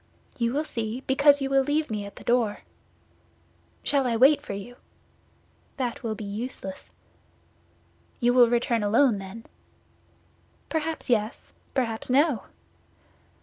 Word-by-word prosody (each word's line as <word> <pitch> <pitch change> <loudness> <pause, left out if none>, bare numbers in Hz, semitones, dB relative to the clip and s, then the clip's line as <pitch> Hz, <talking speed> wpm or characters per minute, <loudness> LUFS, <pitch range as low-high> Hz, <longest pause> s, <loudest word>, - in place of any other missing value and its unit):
"You 235 -1 +1
will 295 +2 0
see, 230 -3 -4
because 285 +1 +4
you 270 - -2
will 270 0 +5
leave 295 0 0
me 205 -2 -3
at 200 - -12
the - - -12
door." 235 -4 +1 1.2
"Shall 275 -3 +2
I 235 - 0
wait 270 +6 +5
for - - -6
you?" 230 +5 -8 1.0
"That 245 -3 -3
will 225 -3 -3
be 215 - -7
useless." 200 -2 -6 1.3
"You 245 0 +3
will 245 -2 +6
return 235 -1 +1
alone, 220 +2 +3
then?" 195 +4 -9 1.2
"Perhaps 320 0 -2
yes, 220 -2 -1 0.2
perhaps 230 -4 -1
no." 275 -1 +2
245 Hz, 130 wpm, -26 LUFS, 220-270 Hz, 1.3 s, will